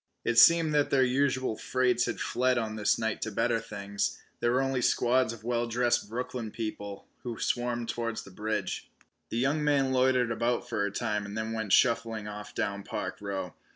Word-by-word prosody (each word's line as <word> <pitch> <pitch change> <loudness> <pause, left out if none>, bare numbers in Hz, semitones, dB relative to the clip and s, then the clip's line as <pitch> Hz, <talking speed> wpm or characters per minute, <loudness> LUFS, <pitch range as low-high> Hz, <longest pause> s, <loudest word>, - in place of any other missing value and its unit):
It 120 0 +4
seemed 165 +3 +7
that 145 -1 +3
their 135 -1 +4
usual 130 -2 +1
freights 125 0 +1
had - - -3
fled 125 0 +1
on 110 -2 -2
this 105 -1 +2
night 110 -2 -2
to 110 - -2
better 115 +3 +1
things. 100 -1 -3 0.2
There 120 - +2
were 130 +2 +2
only 135 -1 0
squads 125 0 +2
of 115 -2 -10
well 120 0 0
dressed 120 -2 +1
Brooklyn 120 -1 -4
people 105 -3 -6
who 120 -2 -6
swarmed 120 -1 -1
towards 115 -1 -3
the 100 - -13
bridge. 105 -1 -3 0.4
The 115 - -3
young 140 +5 +1
man 140 -3 +2
loitered 130 -2 +3
about 120 +1 0
for 100 - -1
a 100 - -2
time 105 -1 -1
and 100 +1 -6
then 110 0 -2
went 110 -3 -3
shuffling 115 -3 +2
off 105 0 -8
down 100 0 -1
Park - - -4
Row. 95 -3 -4
115 Hz, 190 wpm, -29 LUFS, 110-125 Hz, 0.4 s, seemed